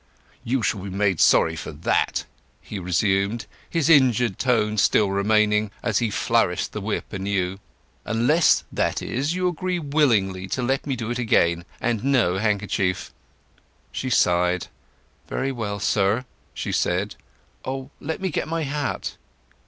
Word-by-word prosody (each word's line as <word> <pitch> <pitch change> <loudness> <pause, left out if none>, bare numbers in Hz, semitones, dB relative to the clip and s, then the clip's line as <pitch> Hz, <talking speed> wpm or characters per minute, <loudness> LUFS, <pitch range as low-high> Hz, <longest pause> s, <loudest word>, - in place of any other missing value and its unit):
"You 125 0 0
shall 100 -1 0
be 100 - -6
made 95 -2 0
sorry - - +4
for - - -6
that!" - - 0 0.3
he 105 - -7
resumed, 100 +4 0 0.2
his 165 -3 0
injured 125 - +4
tone 110 -4 +1
still 100 -1 +3
remaining, 105 +1 +2
as 105 - +1
he 115 - 0
flourished - - +1
the - - -5
whip - - -3
anew. 95 -1 -2 0.4
"Unless, 125 +9 +3
that - - -1
is, 145 +7 -1
you 185 0 +1
agree 180 +1 -1
willingly 115 - +1
to 125 +7 -2
let 135 +3 -1
me 135 - 0
do 115 -1 -4
it 120 - -2
again, 85 -7 +2
and 115 -2 -1
no 120 -10 +2
handkerchief." 100 -3 -1 0.8
She 130 - -3
sighed. 90 -5 +2 0.6
"Very 135 +1 -2
well, 105 -5 -4
sir!" 100 +4 +1 0.3
she - - -3
said. 95 +3 0 0.5
"Oh—let 135 +4 -5
me 190 0 -1
get - - -2
my 165 0 -2
hat!" 145 0 -3
110 Hz, 145 wpm, -23 LUFS, 100-135 Hz, 0.8 s, sorry